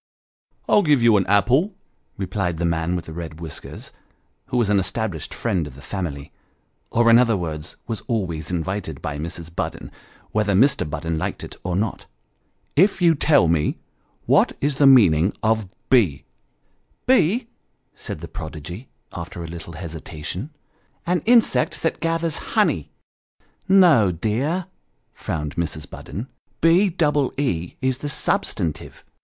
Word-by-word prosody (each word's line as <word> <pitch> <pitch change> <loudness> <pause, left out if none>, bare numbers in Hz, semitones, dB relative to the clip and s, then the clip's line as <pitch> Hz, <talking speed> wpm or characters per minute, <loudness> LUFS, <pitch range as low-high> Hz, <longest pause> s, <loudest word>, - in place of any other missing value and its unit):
" - - -44
I'll 210 - +5
give 145 -9 +3
you 115 -2 +6
an 95 - 0
apple," 125 - +3 0.4
replied 95 -3 -2
the 85 - -1
man 85 +1 0
with 90 - -4
the 80 - -8
red 80 -2 -7
whiskers, 80 -4 -7 0.6
who 125 - -2
was 115 -4 +2
an 100 - +4
established 95 -4 -2
friend 95 -10 -1
of 65 - -11
the 70 - -12
family, 80 -7 -5 0.6
or 120 0 +2
in 115 - +8
other 115 -4 +3
words 80 -4 -5
was 115 -3 -4
always 90 - -2
invited 90 -2 -3
by 75 0 -4
Mrs. 85 +1 -6
Budden, - - -4 0.4
whether 105 -1 +1
Mr. 125 - +3
Budden 80 +1 -3
liked - - -3
it - - -8
or 90 -1 -2
not, 105 +4 -2 0.4
" - - -45
if 200 - -4
you'll 170 -3 +5
tell 145 - +4
me 80 -2 +1 0.5
what - - +4
is 140 -1 0
the 145 - +6
meaning 95 -9 +6
of 110 -3 +1 0.2
be" 85 - +3 0.4
" - - -43
Be? 235 -1 +3 0.2
" - - -48
said - - -7
the - - -6
prodigy, 85 - -8 0.2
after 85 - -6
a - - -6
little 85 0 -8
hesitation 80 - -6 0.3
" - - -41
an 180 - +1
insect 235 -1 +3
that - - 0
gathers 165 -1 -1 0.2
honey." - - +2 0.5
" - - -39
No, 165 - +6
dear," 125 - -1 0.5
frowned 75 -2 -4
Mrs. 75 -3 -3
Budden; 110 - -7 0.2
" - - -43
B 175 +5 +5
double 150 -5 +1
E 90 - -1
is 130 0 +1
the 145 - -4
substantive." 80 - -2
100 Hz, 160 wpm, -22 LUFS, 80-135 Hz, 0.6 s, in